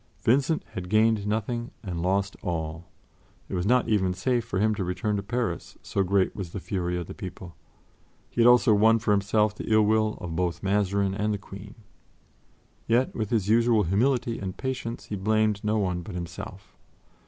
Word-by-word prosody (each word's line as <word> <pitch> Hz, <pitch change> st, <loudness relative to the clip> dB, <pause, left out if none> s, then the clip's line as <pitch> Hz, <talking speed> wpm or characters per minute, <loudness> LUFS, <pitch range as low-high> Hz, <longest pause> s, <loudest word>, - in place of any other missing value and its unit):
Vincent 140 Hz, +6 st, +2 dB
had 90 Hz, -1 st, -6 dB
gained 110 Hz, 0 st, +3 dB
nothing 115 Hz, +3 st, -2 dB
and 90 Hz, -4 st, -4 dB
lost 100 Hz, +2 st, 0 dB
all; 80 Hz, -1 st, -4 dB, 0.6 s
it -, -, -8 dB
was 90 Hz, +1 st, -1 dB
not 125 Hz, +2 st, +3 dB
even 95 Hz, -4 st, +1 dB
safe 120 Hz, +5 st, 0 dB
for 110 Hz, -4 st, -4 dB
him 110 Hz, +2 st, +2 dB
to 100 Hz, -, -2 dB
return 105 Hz, +4 st, -1 dB
to 100 Hz, -, -1 dB
Paris, 120 Hz, +4 st, -3 dB
so 100 Hz, -, -1 dB
great 95 Hz, 0 st, +1 dB
was 90 Hz, -4 st, -6 dB
the -, -, -3 dB
fury 90 Hz, -2 st, -2 dB
of 90 Hz, -, -4 dB
the -, -, -8 dB
people; 90 Hz, -1 st, -9 dB, 0.7 s
he 120 Hz, -, -1 dB
had 115 Hz, -, +6 dB
also 120 Hz, -1 st, +6 dB
won 110 Hz, +2 st, +5 dB
for 110 Hz, -1 st, -1 dB
himself 105 Hz, +1 st, +2 dB
the 105 Hz, -, -6 dB
ill 110 Hz, 0 st, +5 dB
will 110 Hz, 0 st, +2 dB
of 85 Hz, -2 st, -5 dB
both 85 Hz, -1 st, -1 dB
Mazarin 100 Hz, 0 st, +1 dB
and 105 Hz, +1 st, -1 dB
the 105 Hz, -, -1 dB
Queen. 100 Hz, +1 st, -11 dB, 1.1 s
Yet 120 Hz, +3 st, +2 dB
with 110 Hz, -3 st, -3 dB
his 110 Hz, -5 st, 0 dB
usual 115 Hz, 0 st, +4 dB
humility 115 Hz, +5 st, +1 dB
and 95 Hz, -2 st, -5 dB
patience, 130 Hz, -3 st, -4 dB
he 105 Hz, -, -4 dB
blamed 110 Hz, +1 st, +1 dB
no 105 Hz, +1 st, +1 dB
one 90 Hz, -4 st, -1 dB
but 90 Hz, +2 st, -8 dB
himself. 90 Hz, +3 st, -8 dB
105 Hz, 190 wpm, -26 LUFS, 95-110 Hz, 1.1 s, had